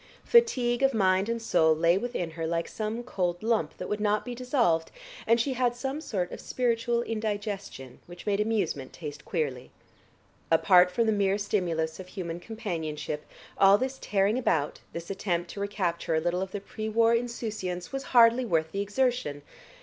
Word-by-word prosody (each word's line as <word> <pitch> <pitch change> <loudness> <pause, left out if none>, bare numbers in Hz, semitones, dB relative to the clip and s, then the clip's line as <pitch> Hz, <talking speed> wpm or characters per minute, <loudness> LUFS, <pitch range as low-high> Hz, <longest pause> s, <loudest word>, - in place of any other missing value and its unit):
Fatigue 260 - +3
of 270 -2 +3
mind 190 0 +2
and 230 0 -1
soul 160 -8 +3
lay 165 +2 +3
within 195 -5 -2
her 165 0 -4
like 170 0 -1
some 220 +2 -4
cold 180 -6 -2
lump 220 -9 0
that 180 - -5
would 210 - -2
not 210 0 +1
be 245 - -4
dissolved 240 - +1 0.4
and 230 +1 +4
she 265 +3 0
had 245 -1 +1
some 270 +4 -3
sort 185 - -2
of - - -7
spiritual 235 -1 0
indigestion 205 - -4
which 175 0 -11
made 205 -1 +1
amusement 200 -11 -1
taste 150 -3 -8
queerly. 130 -5 -3 0.8
Apart 180 +2 +6
from 230 +6 +1
the 220 - +3
mere 200 -1 +2
stimulus 170 -6 -1
of 185 - -8
human 175 -3 -5
companionship, 160 -9 -5 0.3
all 195 +1 +7
this 260 +3 -3
tearing 205 +4 +1
about, 150 - 0
this 170 +2 -6
attempt 175 -3 -2
to - - -8
recapture 185 -5 -1
a - - +3
little 175 +2 -1
of 190 0 -4
the 205 - -4
pre 215 +2 -5
war 230 +1 +4
insouciance 220 -6 -3
was 270 0 -4
hardly 235 0 +5
worth 160 -8 0
the 200 - -2
exertion. 205 - -1
200 Hz, 175 wpm, -28 LUFS, 170-230 Hz, 0.8 s, all